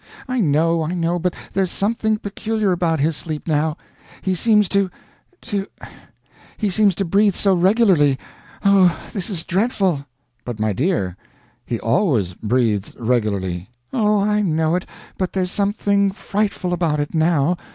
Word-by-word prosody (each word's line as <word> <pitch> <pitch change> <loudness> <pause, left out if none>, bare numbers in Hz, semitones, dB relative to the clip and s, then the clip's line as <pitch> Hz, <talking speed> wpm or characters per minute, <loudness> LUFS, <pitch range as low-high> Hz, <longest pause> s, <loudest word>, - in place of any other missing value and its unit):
"I 255 -1 -1
know. 165 -1 +2
I 160 +3 -2
know; 170 0 0
but 180 +1 -1 0.2
there's 190 -1 +1
something 220 +2 0
peculiar 210 0 -2
about 170 -3 +1
his 155 +3 +1
sleep 155 0 -5
now. 155 0 +1 0.5
He 190 - +1
seems 210 +2 +3
to 200 -1 +1 0.5
to 200 -4 -3 0.9
he 210 -3 0
seems 200 -1 +3
to 195 - -1
breathe 200 +2 +3
so 195 -2 +3
regularly. 180 - +4 0.5
Oh, 190 -3 +5
this 195 -1 -3
is 175 -5 -3
dreadful." 190 - 0 0.4
"But, 120 -3 -6
my 110 -1 +1
dear, 100 - -1 0.5
he 115 - -2
always 115 - +1
breathes 110 -1 0
regularly." 100 -6 -1 0.2
"Oh, 210 -3 +2
I 210 +1 +2
know 160 -4 +1
it, 180 +1 -1 0.3
but 185 -2 -1
there's 185 -1 -1
something 200 -1 +1
frightful 195 -2 -2
about 165 -4 0
it 145 - -3
now. 160 0 +2
180 Hz, 150 wpm, -20 LUFS, 150-200 Hz, 0.9 s, Oh